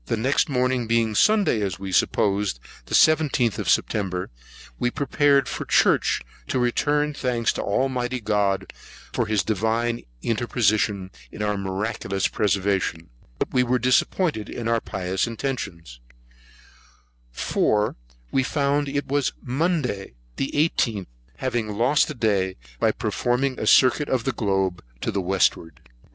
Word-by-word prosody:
Next 125 Hz, +6 st, +1 dB
morning 125 Hz, -2 st, 0 dB
being 115 Hz, -1 st, +2 dB
Sunday, 200 Hz, -, +3 dB
as 95 Hz, -4 st, -2 dB
we 95 Hz, 0 st, -6 dB
supposed, 100 Hz, -, +1 dB, 0.3 s
the -, -, -1 dB
17th 150 Hz, -, +3 dB
of -, -, -2 dB
September, 95 Hz, -4 st, 0 dB, 0.5 s
we -, -, +1 dB
were 120 Hz, -, -2 dB
preparing 140 Hz, 0 st, +2 dB
for -, -, -4 dB
Church, -, -, +3 dB, 0.3 s
to -, -, -1 dB
return 145 Hz, +4 st, +1 dB
thanks 125 Hz, -5 st, 0 dB
to -, -, -3 dB
Almighty 125 Hz, +2 st, -1 dB
God, 100 Hz, -3 st, 0 dB, 0.4 s
for 120 Hz, -, 0 dB
his 105 Hz, -2 st, +1 dB
divine 115 Hz, +3 st, 0 dB, 0.2 s
interposition 105 Hz, -4 st, 0 dB, 0.2 s
in 105 Hz, -, -5 dB
our 105 Hz, 0 st, 0 dB
miraculous 100 Hz, 0 st, -2 dB
preservation; 95 Hz, -6 st, -1 dB, 0.3 s
but -, -, -3 dB
were 125 Hz, 0 st, +2 dB
disappointed 125 Hz, -, +1 dB
in 120 Hz, -2 st, -5 dB
our 115 Hz, -1 st, +1 dB
pious 95 Hz, +3 st, -2 dB
intentions; 100 Hz, -, -5 dB, 1.3 s
for 105 Hz, -, 0 dB, 0.4 s
we 135 Hz, -, +2 dB
found 140 Hz, +1 st, 0 dB
it 140 Hz, +1 st, -2 dB
was 140 Hz, 0 st, 0 dB
Monday, 130 Hz, -, -2 dB, 0.2 s
the 135 Hz, -, -1 dB, 0.3 s
18th, 105 Hz, -6 st, 0 dB, 0.3 s
having 120 Hz, -4 st, -1 dB
lost 130 Hz, +6 st, +3 dB
a -, -, -5 dB
day 100 Hz, -5 st, 0 dB, 0.2 s
by -, -, +3 dB
performing 130 Hz, +2 st, -1 dB
a -, -, -2 dB
circuit 135 Hz, +3 st, +5 dB
of 125 Hz, -3 st, 0 dB
the 135 Hz, -, 0 dB
globe 95 Hz, -5 st, -1 dB, 0.2 s
to -, -, -1 dB
the 100 Hz, -, -1 dB
westward. 90 Hz, -4 st, 0 dB
115 Hz, 135 wpm, -24 LUFS, 100-130 Hz, 1.3 s, circuit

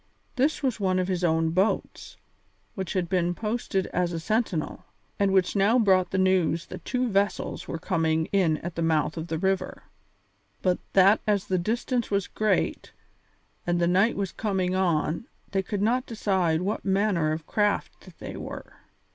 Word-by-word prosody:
This 285 Hz, +4 st, +1 dB
was 255 Hz, -4 st, 0 dB
one 185 Hz, -2 st, +1 dB
of 185 Hz, 0 st, 0 dB
his 185 Hz, -2 st, -1 dB
own 160 Hz, -1 st, +2 dB
boats, 190 Hz, +5 st, -1 dB, 0.6 s
which 190 Hz, -3 st, -4 dB
had 185 Hz, -2 st, 0 dB
been 175 Hz, -1 st, 0 dB
posted 210 Hz, -3 st, -2 dB
as 180 Hz, -1 st, +1 dB
a 165 Hz, -, -2 dB
sentinel, 215 Hz, -3 st, -1 dB, 0.4 s
and 200 Hz, -1 st, +3 dB
which 190 Hz, 0 st, +2 dB
now 205 Hz, +5 st, +4 dB
brought 190 Hz, -6 st, +3 dB
the 190 Hz, -, -2 dB
news 185 Hz, -3 st, +2 dB
that -, -, -9 dB
two 250 Hz, -1 st, -1 dB
vessels 200 Hz, -1 st, -1 dB
were -, -, -3 dB
coming 160 Hz, -2 st, 0 dB
in 180 Hz, -6 st, +2 dB
at 175 Hz, -, -4 dB
the 165 Hz, -, -4 dB
mouth 160 Hz, -2 st, +1 dB
of 165 Hz, 0 st, -5 dB
the 165 Hz, -1 st, -2 dB
river, 190 Hz, +3 st, -1 dB, 0.8 s
but 180 Hz, -1 st, +2 dB
that 195 Hz, +3 st, +6 dB
as 205 Hz, -3 st, +1 dB
the 185 Hz, -1 st, 0 dB
distance 235 Hz, +5 st, -1 dB
was 200 Hz, -2 st, 0 dB
great 215 Hz, 0 st, -1 dB, 0.7 s
and 175 Hz, 0 st, +1 dB
the 170 Hz, -, +3 dB
night 190 Hz, +6 st, +3 dB
was 195 Hz, -3 st, -2 dB
coming 190 Hz, -4 st, -1 dB
on 170 Hz, -, 0 dB, 0.2 s
they 195 Hz, -, +1 dB
could 200 Hz, +1 st, -3 dB
not 250 Hz, +4 st, +1 dB
decide 185 Hz, -7 st, 0 dB
what 205 Hz, +3 st, -2 dB
manner 190 Hz, -5 st, +1 dB
of 155 Hz, 0 st, -4 dB
craft 205 Hz, -1 st, -1 dB
they -, -, -7 dB
were. -, -, -8 dB
190 Hz, 170 wpm, -26 LUFS, 170-205 Hz, 0.8 s, that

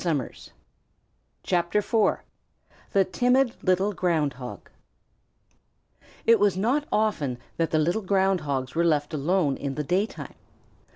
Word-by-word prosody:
THE 155 Hz, -8 st, -3 dB, 2.5 s
TIMID 250 Hz, +5 st, +2 dB
LITTLE 190 Hz, +2 st, +2 dB
GROUND 165 Hz, -6 st, 0 dB
HOG 125 Hz, -5 st, -9 dB, 1.5 s
It 230 Hz, -1 st, +5 dB
was 200 Hz, -2 st, +2 dB
not 260 Hz, +9 st, 0 dB
often 170 Hz, -, 0 dB, 0.2 s
that 165 Hz, -1 st, 0 dB
the 155 Hz, -, +1 dB
little 175 Hz, +8 st, +1 dB
Ground 190 Hz, -2 st, +1 dB
Hogs 135 Hz, -3 st, -3 dB
were 170 Hz, -, +1 dB
left 150 Hz, -2 st, +1 dB
alone 155 Hz, 0 st, +1 dB
in 140 Hz, -1 st, -4 dB
the 150 Hz, -, -2 dB
daytime. 190 Hz, +9 st, -2 dB
175 Hz, 110 wpm, -25 LUFS, 145-205 Hz, 2.5 s, It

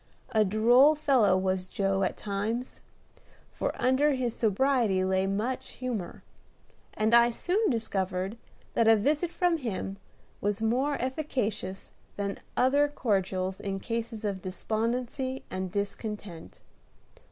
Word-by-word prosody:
A 220 Hz, -3 st, +4 dB
droll 240 Hz, +9 st, +5 dB
fellow 265 Hz, -11 st, +3 dB
was 185 Hz, -1 st, -1 dB
Joe 195 Hz, 0 st, 0 dB
at 185 Hz, -, 0 dB
times, 215 Hz, +5 st, -3 dB, 0.7 s
for -, -, -3 dB
under 270 Hz, +4 st, +3 dB
his 250 Hz, -3 st, -1 dB
sobriety 225 Hz, -3 st, +2 dB
lay 190 Hz, 0 st, +1 dB
much 215 Hz, +6 st, -2 dB
humor; 235 Hz, -9 st, -5 dB, 0.7 s
and 215 Hz, +2 st, +1 dB
I 235 Hz, 0 st, +7 dB
soon 370 Hz, -, 0 dB
discovered 195 Hz, -4 st, -2 dB, 0.4 s
that 230 Hz, -, +3 dB
a 225 Hz, -, +8 dB
visit 295 Hz, -, +1 dB
from 350 Hz, -1 st, +1 dB
him 200 Hz, -7 st, -4 dB, 0.4 s
was 205 Hz, +1 st, 0 dB
more 255 Hz, +6 st, +1 dB
efficacious 245 Hz, -8 st, -3 dB, 0.3 s
than 200 Hz, -1 st, -3 dB, 0.2 s
other 285 Hz, +3 st, +4 dB
cordials 190 Hz, -8 st, -1 dB
in 195 Hz, -1 st, -3 dB
cases 230 Hz, 0 st, -4 dB
of 195 Hz, -2 st, -2 dB
despondency 240 Hz, +7 st, -2 dB
and 185 Hz, -1 st, -3 dB
discontent. 200 Hz, -3 st, -5 dB
220 Hz, 120 wpm, -28 LUFS, 195-255 Hz, 0.7 s, a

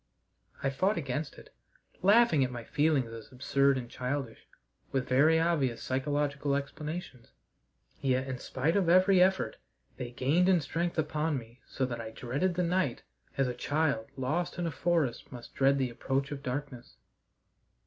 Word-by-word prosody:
I 135 Hz, -, +1 dB
fought 190 Hz, +9 st, +1 dB
against 150 Hz, 0 st, -3 dB
it, -, -, -15 dB, 0.5 s
laughing 200 Hz, -, +5 dB
at 130 Hz, -, 0 dB
my 120 Hz, -2 st, -6 dB
feelings 145 Hz, -3 st, +1 dB
as 115 Hz, -2 st, -10 dB
absurd 140 Hz, +1 st, +2 dB
and 125 Hz, -2 st, -5 dB
childish, 125 Hz, -1 st, -4 dB, 0.4 s
with 130 Hz, -2 st, -1 dB
very 150 Hz, +6 st, +4 dB
obvious 150 Hz, -8 st, 0 dB
physiological 140 Hz, +1 st, 0 dB
explanations, 140 Hz, -2 st, -5 dB, 0.7 s
yet, 130 Hz, -1 st, +1 dB
in 130 Hz, -1 st, -4 dB
spite 150 Hz, +7 st, -1 dB
of 190 Hz, -4 st, +2 dB
every 185 Hz, +1 st, +6 dB
effort, 190 Hz, +1 st, +2 dB, 0.4 s
they 125 Hz, -1 st, -5 dB
gained 145 Hz, +9 st, +2 dB
in 185 Hz, -2 st, +5 dB
strength 170 Hz, +3 st, -2 dB
upon 155 Hz, 0 st, 0 dB
me 120 Hz, 0 st, -10 dB
so 130 Hz, -, -1 dB
that 120 Hz, -2 st, -4 dB
I 110 Hz, -, -6 dB
dreaded 140 Hz, +11 st, -2 dB
the 180 Hz, -, +1 dB
night 175 Hz, -7 st, 0 dB, 0.3 s
as 135 Hz, -1 st, +2 dB
a 125 Hz, -, -2 dB
child 140 Hz, -2 st, 0 dB
lost 150 Hz, +8 st, -1 dB
in 175 Hz, -, -1 dB
a 165 Hz, -, -1 dB
forest 165 Hz, -8 st, 0 dB
must 120 Hz, -2 st, -10 dB
dread 135 Hz, +1 st, +3 dB
the 130 Hz, -2 st, 0 dB
approach 135 Hz, +3 st, -2 dB
of 140 Hz, -1 st, -5 dB
darkness. 130 Hz, -2 st, -5 dB
140 Hz, 160 wpm, -30 LUFS, 130-165 Hz, 0.7 s, every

